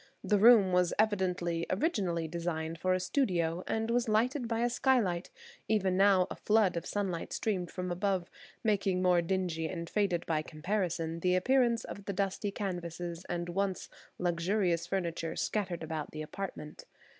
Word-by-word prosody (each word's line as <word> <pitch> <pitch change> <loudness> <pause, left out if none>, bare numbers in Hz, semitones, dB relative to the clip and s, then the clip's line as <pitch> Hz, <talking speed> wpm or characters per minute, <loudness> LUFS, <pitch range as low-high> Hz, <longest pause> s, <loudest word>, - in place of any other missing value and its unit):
The 210 -1 +2
room 215 -3 +7
was 180 -1 +3
evidently, 180 -5 0
originally 185 - 0
designed 165 -1 -3
for 185 +1 +2
a - - 0
studio, 180 - 0
and 225 +1 -1
was 240 0 +1
lighted 240 +4 +1
by 230 0 -1
a 240 - +2
skylight; 230 -9 +1 0.4
even 195 -4 +2
now 195 -1 +5
a - - -3
flood 210 -4 +2
of 170 - -3
sunlight 190 -5 -2
streamed 185 -6 -1
from 180 -1 -4
above, 185 -1 0 0.4
making 195 -4 +1
more 180 -1 +4
dingy 170 -2 -1
and 170 -1 -5
faded 185 -3 0
by 155 -2 0
comparison 165 0 -2
the 180 +1 +2
appearance 235 +4 +3
of 200 - -8
the 200 - -3
dusty 195 +1 -1
canvases 175 -3 -5
and 175 0 -2
once 195 +1 -2 0.3
luxurious 175 0 0
furniture 170 -3 -2
scattered 185 -6 -2
about 160 -1 -4
the 155 0 -6
apartment. 155 -3 -7
185 Hz, 155 wpm, -31 LUFS, 170-205 Hz, 0.4 s, room